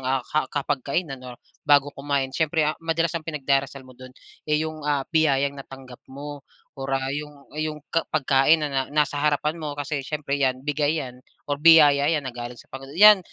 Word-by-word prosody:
ah, 130 Hz, -1 st, -1 dB
ka 150 Hz, -3 st, -1 dB
kapag 145 Hz, -1 st, -2 dB
kainan 140 Hz, 0 st, -3 dB
or 125 Hz, -1 st, -10 dB, 0.2 s
bago 145 Hz, -1 st, +3 dB
kumain. 140 Hz, -1 st, -2 dB
Siyempre, 160 Hz, +2 st, +1 dB
ah, 150 Hz, -, +1 dB
madalas 165 Hz, 0 st, 0 dB
ang 165 Hz, -, -2 dB
pinagdarasal 140 Hz, -2 st, -1 dB
mo 130 Hz, -, -15 dB
dun, 130 Hz, +1 st, -12 dB, 0.4 s
eh, 150 Hz, -, +3 dB
yung, 155 Hz, 0 st, -6 dB
ah, 145 Hz, -2 st, -1 dB
biyayang 140 Hz, -3 st, +2 dB
natanggap 135 Hz, -2 st, -12 dB
mo 145 Hz, +1 st, -8 dB, 0.3 s
or, 135 Hz, 0 st, -7 dB
ah, 135 Hz, 0 st, -3 dB
yung 150 Hz, +1 st, -5 dB, 0.2 s
ah, 155 Hz, -, -4 dB
yung 150 Hz, -1 st, -4 dB
ka 165 Hz, -, 0 dB
pagkain 140 Hz, +1 st, +3 dB
na 135 Hz, -2 st, -2 dB
nasa 145 Hz, -1 st, 0 dB
harapan 150 Hz, +2 st, 0 dB
mo 150 Hz, -2 st, -5 dB
kasi 145 Hz, 0 st, -3 dB
siyempre 140 Hz, 0 st, -3 dB
yan 130 Hz, -1 st, 0 dB
bigay 150 Hz, 0 st, 0 dB
yan, 125 Hz, 0 st, -11 dB, 0.2 s
or 145 Hz, 0 st, -3 dB
biyaya 150 Hz, -3 st, +6 dB
yan 150 Hz, -3 st, 0 dB
na 130 Hz, -, -5 dB
galing 120 Hz, 0 st, -7 dB
sa -, -, -14 dB
panginoon 135 Hz, +2 st, -9 dB
yan, 210 Hz, +1 st, +9 dB
145 Hz, 200 wpm, -24 LUFS, 135-150 Hz, 0.4 s, yan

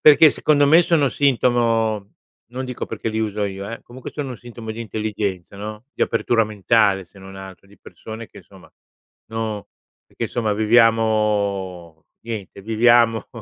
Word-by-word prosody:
perché, 150 Hz, 0 st, +8 dB
secondo 145 Hz, -2 st, +3 dB
me, 165 Hz, +4 st, +7 dB
sono 155 Hz, -5 st, +2 dB
sintomo 115 Hz, -6 st, +1 dB, 0.4 s
non 130 Hz, +1 st, -4 dB
dico 125 Hz, -1 st, -5 dB
perché -, -, -4 dB
li 110 Hz, -, -2 dB
uso 105 Hz, -1 st, -1 dB
io, 100 Hz, 0 st, -5 dB
eh, 115 Hz, -, -7 dB
comunque, 125 Hz, +1 st, -10 dB
sono 140 Hz, -4 st, -5 dB
sintomo 120 Hz, -2 st, -9 dB
di 115 Hz, -, -8 dB
intelligenza, 105 Hz, -4 st, -4 dB
no, 105 Hz, +3 st, -7 dB
di -, -, -2 dB
apertura 115 Hz, 0 st, +2 dB
mentale, 100 Hz, -2 st, +2 dB
se 95 Hz, +3 st, -19 dB
non 95 Hz, 0 st, -11 dB
altro 95 Hz, 0 st, -11 dB
di 100 Hz, -, -20 dB
persone 110 Hz, 0 st, -10 dB
che -, -, -15 dB
insomma -, -, -17 dB, 0.6 s
no 110 Hz, -2 st, -4 dB, 0.4 s
perché, -, -, -5 dB
insomma, 110 Hz, -3 st, -1 dB
viviamo 105 Hz, -6 st, +1 dB, 0.2 s
niente, 105 Hz, -4 st, -6 dB
viviamo 115 Hz, 0 st, +3 dB
110 Hz, 150 wpm, -21 LUFS, 100-120 Hz, 0.6 s, perché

